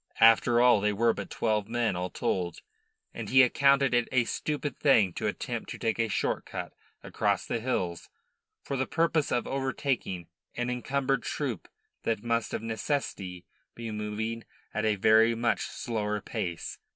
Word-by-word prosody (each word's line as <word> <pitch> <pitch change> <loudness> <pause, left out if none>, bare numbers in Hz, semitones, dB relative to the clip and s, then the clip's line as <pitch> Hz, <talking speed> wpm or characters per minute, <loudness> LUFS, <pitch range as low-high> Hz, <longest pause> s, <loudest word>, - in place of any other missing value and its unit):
After 115 +1 +6
all, 120 -4 +6
they 105 0 +1
were 115 +2 +3
but - - -6
twelve 105 -3 0
men 115 -3 0
all 90 +1 -2
told, 90 -3 -2 0.5
and - - -6
he 130 0 +7
accounted 140 +1 +4
it 120 -1 +2
a 130 -2 +3
stupid 145 +3 -3
thing 110 - +4
to - - -2
attempt - - -4
to - - -5
take 115 0 -1
a 115 - +2
short 105 - -1
cut - - -6 0.3
across - - 0
the 115 - -2
hills 95 -8 -2 0.5
for 140 - -3
the 130 0 -1
purpose 165 -2 +1
of 120 - +1
overtaking 130 - -2 0.3
an 120 +1 -1
encumbered 135 +1 0
troop 130 - -3 0.3
that 110 -2 -1
must 115 -1 0
of - - -3
necessity 100 - -3 0.3
be 115 -1 -5
moving 110 +2 -3 0.3
at 110 0 -1
a 110 -1 +3
very 110 +3 +5
much 115 0 +1
slower 105 -3 -2
pace. 85 -3 -4
115 Hz, 165 wpm, -29 LUFS, 105-130 Hz, 0.5 s, he